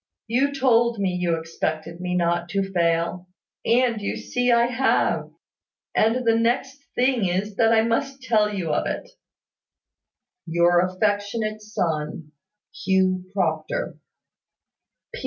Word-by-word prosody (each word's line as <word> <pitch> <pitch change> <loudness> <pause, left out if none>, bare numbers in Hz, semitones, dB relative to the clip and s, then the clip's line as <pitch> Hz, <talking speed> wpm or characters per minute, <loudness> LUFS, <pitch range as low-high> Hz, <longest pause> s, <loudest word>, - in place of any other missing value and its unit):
You 260 +5 +1
told 240 -4 +2
me 195 -2 0
you 180 -2 0
expected 160 +1 -4
me 180 0 -2
not 175 0 0
to 195 0 -1
fail; 170 +1 0 0.4
and 235 -2 +2
you 200 - -3
see 245 0 0
I 235 0 +5
have; 250 +2 +1 0.6
and 235 +3 +2
the 225 -1 +4
next 260 +4 0
thing 250 -5 +2
is 195 +3 -2
that 225 -1 +4
I 220 -1 +4
must 265 +4 -1
tell 215 -4 +2
you 180 -6 -2
of - - 0
it. - - -4 1.4
"Your 170 +1 +3
affectionate 205 +3 -1
son, 160 -7 -3 0.4
"Hugh 185 -1 +1
Proctor. 160 -5 -2
205 Hz, 120 wpm, -23 LUFS, 175-235 Hz, 1.4 s, I